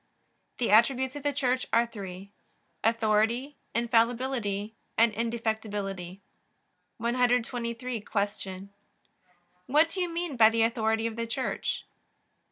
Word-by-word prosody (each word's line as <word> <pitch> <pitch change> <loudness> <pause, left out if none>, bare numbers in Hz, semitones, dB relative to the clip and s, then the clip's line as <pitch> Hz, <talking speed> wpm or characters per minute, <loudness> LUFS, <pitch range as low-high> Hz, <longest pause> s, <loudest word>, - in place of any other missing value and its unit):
The 235 -4 0
attributes 260 +4 +4
of 290 - -5
the 290 +1 +1
Church 255 -2 0
are 235 +1 +4
three: 200 -4 -8 0.5
authority 225 +4 +2 0.2
infallibility, 230 -3 +1 0.2
and 230 -1 +5
indefectibility. 210 -5 -3 0.8
123. 240 0 0
Q. 200 -2 -3 1.0
What 305 +5 +4
do 370 +3 -3
you 355 - 0
mean 335 -5 -3
by 220 -1 +8
the 225 0 +2
authority 225 -1 +1
of 230 0 -3
the 230 0 -2
Church? 255 +3 -2
230 Hz, 110 wpm, -28 LUFS, 215-250 Hz, 1.0 s, by